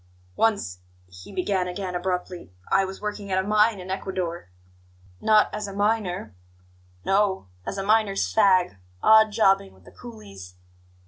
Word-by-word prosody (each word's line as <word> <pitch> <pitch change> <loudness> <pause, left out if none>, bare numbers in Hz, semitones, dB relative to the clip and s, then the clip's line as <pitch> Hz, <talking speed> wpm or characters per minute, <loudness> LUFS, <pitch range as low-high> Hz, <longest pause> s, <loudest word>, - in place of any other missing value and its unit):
"Once," 200 - 0 0.3
he 90 - -13
began 190 -1 -1
again 180 0 -5
abruptly, 180 - -4 0.2
"I 195 - +4
was 190 0 -8
working 210 -1 -5
at 185 - +1
a 190 +1 0
mine 210 0 +3
in 185 +1 -7
Ecuador 180 - -4 0.3
" 90 0 -29
"Not 215 -1 +4
as 210 -1 -4
a 200 - -7
miner?" 205 - -1 0.7
"No, 195 - +1 0.2
as 200 - -4
a 195 - -2
miner's 210 - +2
fag 185 - +3 0.3
odd 220 0 +6
jobbing 195 - +2
with 95 - -22
the - - -15
coolies. 100 -5 -12
190 Hz, 150 wpm, -24 LUFS, 165-205 Hz, 0.7 s, odd